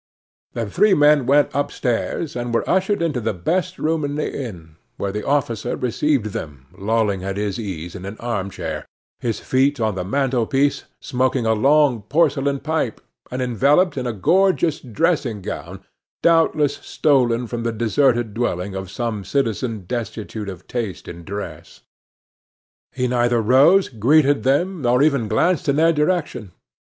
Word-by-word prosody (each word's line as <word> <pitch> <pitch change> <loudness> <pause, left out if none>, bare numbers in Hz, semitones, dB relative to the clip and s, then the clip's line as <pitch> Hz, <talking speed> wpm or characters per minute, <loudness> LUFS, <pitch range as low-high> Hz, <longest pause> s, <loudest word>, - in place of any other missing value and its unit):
The 115 -2 -3
three 195 - +3
men 145 -3 +4
went 145 +1 +4
upstairs, 140 +1 -2
and 120 0 -3
were - - 0
ushered 190 0 +1
into 150 -7 -1
the 110 -2 -2
best 180 - -1
room 160 0 0
in 145 0 -2
the 150 - -2
inn, 85 - -7 0.2
where 100 - -2
the 105 +1 -4
officer 120 -5 -1
received 125 -3 0
them 70 -4 -7
lolling 105 -1 0
at 95 +1 -3
his 100 -1 -2
ease 90 -6 -5
in 95 - -8
an 100 +2 -7
armchair, 105 -5 -4 0.3
his 115 -3 -2
feet 135 +2 +1
on 110 -2 0
the 95 -1 -3
mantelpiece, 135 +4 0 0.2
smoking 130 -1 0
a 110 - +3
long 135 +1 +3
porcelain 140 +2 +1
pipe, 155 -6 -2 0.3
and 130 +1 -3
enveloped 140 - +2
in 130 -2 -3
a - - 0
gorgeous 175 - +2
dressing 130 -3 -1
gown, 95 - -7 0.4
doubtless 165 -3 +3
stolen 125 -5 +1
from 120 0 -4
the 115 0 -1
deserted 120 0 +1
dwelling 100 -5 -2
of 95 -1 -5
some 115 -2 -3
citizen 115 -3 -1
destitute 110 -1 -5
of 95 -1 -9
taste 110 -9 -4
in 85 0 -9
dress. 100 +4 -8 1.1
He 125 -1 -1
neither 120 -1 +2
rose, 140 - +5
greeted 140 +5 +3
them, 165 +7 +1
nor 125 +1 +3
even 140 -7 +2
glanced 170 +10 +1
in 140 - +3
their 165 +2 +4
direction. 150 - -1
125 Hz, 155 wpm, -21 LUFS, 110-145 Hz, 1.1 s, rose